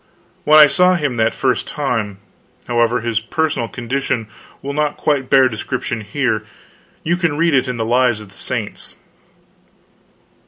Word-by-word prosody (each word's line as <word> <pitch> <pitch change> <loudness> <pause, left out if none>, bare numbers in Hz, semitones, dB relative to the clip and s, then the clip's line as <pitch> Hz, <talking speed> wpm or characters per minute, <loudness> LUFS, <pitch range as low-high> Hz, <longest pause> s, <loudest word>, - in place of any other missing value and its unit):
When 155 +1 +6
I 155 - +10
saw 180 +5 +3
him 145 -7 -2
that 110 0 +1
first 130 -2 0
time 115 -9 -2 0.5
however, 120 0 +1
his 115 -1 -1
personal 130 +1 -1
condition 120 -1 -3 0.4
will 140 +1 -4
not 150 0 -1
quite 140 -4 0
bear 135 -1 +6
description 120 0 -4
here. 110 0 -1 0.6
You 170 +2 0
can 165 -5 0
read 165 -1 +2
it 130 -1 +2
in 125 -1 -3
the 115 - -1
Lives 120 -1 +2
of 105 -2 -12
the 95 - -20
Saints. - - -4
130 Hz, 155 wpm, -18 LUFS, 115-145 Hz, 0.6 s, I